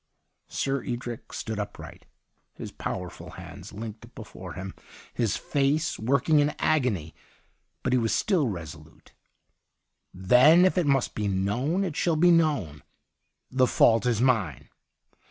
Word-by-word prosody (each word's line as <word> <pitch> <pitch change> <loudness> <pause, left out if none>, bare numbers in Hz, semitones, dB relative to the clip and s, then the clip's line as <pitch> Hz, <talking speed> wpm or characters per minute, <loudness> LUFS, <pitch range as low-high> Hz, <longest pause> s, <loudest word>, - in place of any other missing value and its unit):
' - - -52
SirEdric 120 -3 -3
stood 110 -2 -5
upright, 105 - -8 0.5
his - - -8
power 90 -1 -4
ful - - -11
hands - - -10
linked 110 +1 -9
before - - -9
him, 95 +1 -7 0.4
his 115 -5 0
face 145 +3 0
working 140 +6 +2
in 145 +1 +1
agony; 115 - 0 0.7
but 130 - 0
he 130 - +4
was 115 -1 0
still 180 - +1
resolute. 85 -8 -9 1.0
'Then 125 - +5
if 185 - +2
it 180 -5 +1
must 135 -2 +1
be 105 -1 -2
known, 105 - 0
it 175 -6 -3
shall 170 0 +1
be 175 +3 +5
known. 145 - +1 0.7
The 130 0 +3
fault 115 +1 +4
is 115 -3 +1
mine. 110 - 0
125 Hz, 135 wpm, -26 LUFS, 105-150 Hz, 1.0 s, Then